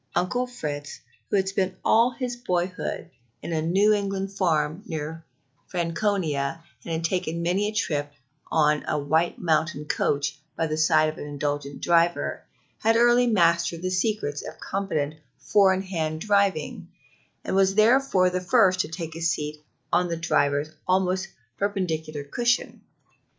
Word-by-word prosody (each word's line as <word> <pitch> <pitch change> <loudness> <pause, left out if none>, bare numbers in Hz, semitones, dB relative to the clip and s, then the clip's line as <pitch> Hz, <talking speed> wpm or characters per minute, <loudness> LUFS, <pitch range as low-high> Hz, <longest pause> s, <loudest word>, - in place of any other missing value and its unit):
Uncle 205 +9 0
Fritz, 145 -12 -6 0.3
who - - 0
had 190 -1 +2
spent 190 -1 -1
all 230 +2 +5
his 250 -1 -4
boyhood 180 -5 -3 0.3
on 170 - -4
a 160 - 0
New 195 +6 +3
England 195 -1 -2
farm 165 -3 0
near 160 0 -5 0.4
Franconia, 165 -4 -1 0.2
and 165 -1 -3
taken 170 -1 -1
many 185 +4 +1
a - - -2
trip 150 -9 -1 0.4
on 150 -1 +3
a - - 0
White 160 +4 +1
Mountain 160 -3 0
coach 145 0 -1 0.2
by 165 - +1
the 155 -1 -2
side 155 0 +4
of 155 - -5
an - - -6
indulgent 145 -1 -4
driver, 170 0 +2 0.4
had 225 +1 +3
early 240 +1 +5
mastered 170 -4 +2
the 185 - -1
secret 185 -6 -1
of 160 - -9
competent 155 -7 -2 0.2
four 200 -2 +4
in 190 0 0
hand 160 -4 -3
driving, 200 -4 0 0.6
and - - -2
was 195 0 +3
therefore 220 -3 +4
first 185 -1 +3
to - - +1
take 165 -1 -6
his 165 0 0
seat 150 -1 -3 0.4
on 175 +1 +3
the 170 -1 -3
driver's 145 -2 +1 0.2
almost 185 0 +1 0.3
perpendicular 160 -7 -2
cushion. 240 +11 -1
175 Hz, 145 wpm, -25 LUFS, 155-195 Hz, 0.6 s, all